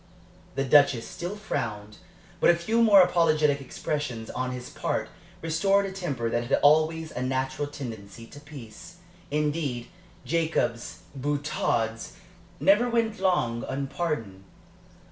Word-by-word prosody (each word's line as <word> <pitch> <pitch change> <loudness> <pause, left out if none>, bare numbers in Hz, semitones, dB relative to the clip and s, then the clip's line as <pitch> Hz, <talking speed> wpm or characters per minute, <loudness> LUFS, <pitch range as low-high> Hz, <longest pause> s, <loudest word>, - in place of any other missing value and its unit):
The 135 - 0
Duchess 140 -3 +4
still 175 +4 -5
frowned, 105 - -4 0.4
but - - +4
a 170 - +6
few 220 +7 0
more 205 -4 +8
apologetic 155 -5 +2
expressions 130 -4 -4
on 130 0 -2
his 125 -1 -6
part - - -2 0.3
restored 195 +5 +2
a 195 - -4
temper 150 -12 -3
that 120 +1 -1
had - - +3
always 155 +2 +4
a 125 - -5
natural 130 +2 -1
tendency 115 -6 -8
to 145 - -13
peace. 145 +1 -11 0.3
Indeed, 150 -5 -1 0.4
Jacob's 155 -6 -1
boutades 135 -5 -1 0.5
never 210 +5 +4
went 230 -3 0
long 175 -12 +1
unpardoned. 135 - -3
145 Hz, 125 wpm, -27 LUFS, 120-170 Hz, 0.5 s, more